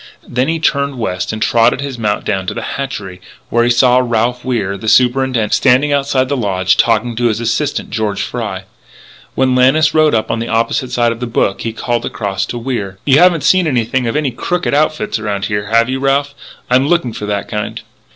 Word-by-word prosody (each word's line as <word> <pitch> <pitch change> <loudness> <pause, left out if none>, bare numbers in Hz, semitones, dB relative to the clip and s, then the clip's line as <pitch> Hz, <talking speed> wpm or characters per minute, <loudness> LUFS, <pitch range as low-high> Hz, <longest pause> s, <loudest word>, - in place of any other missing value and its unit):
Then 125 +2 -1
he 165 +1 0
turned 140 -3 0
west 95 -6 -3
and 110 - -5
trotted 115 -1 +3
his 140 -4 -5
mount 105 -2 -1
down 95 -3 -2
to - - -3
the - - -4
hatchery, 105 -10 -5 0.3
where 120 0 +3
he 120 - +2
saw 125 +1 +4
Ralph 120 0 0
Wier, 110 -7 -1
the 100 +3 -7
Superintendent, 125 -2 +2
standing 140 +3 +3
outside 135 -2 +1
the 140 - -1
lodge 95 -6 +1
talking 115 +1 +1
to 120 +1 +1
his 110 -1 -1
assistant, 120 +5 -2
George 105 -3 -2
Fry. 105 -6 -4 0.7
When 130 -1 +2
Lannis 135 +5 +3
rode 155 -4 +3
up 110 - -1
on 115 - -1
the 115 - -3
opposite 115 +3 -1
side 120 -2 +1
of 115 - -6
the 125 - -3
brook, 100 -3 0
he 115 - -3
called 120 +1 -2
across 100 -2 -3
to 120 - -5
Wier: 115 -6 -4
"You 140 0 +5
haven't 175 -4 +4
seen 185 +3 +3
anything 125 -2 0
of 115 - -2
any 150 -3 0
crooked 175 +9 -2
outfit 155 -4 0
around 105 -2 -3
here, 105 0 -2
have 115 +1 +3
you, 130 +1 -2
Ralph? 140 +1 0 0.3
I'm 130 +2 +2
looking 170 -8 +1
for 105 - -6
that 100 -1 -2
kind." 105 -1 -4
120 Hz, 210 wpm, -15 LUFS, 110-135 Hz, 0.7 s, You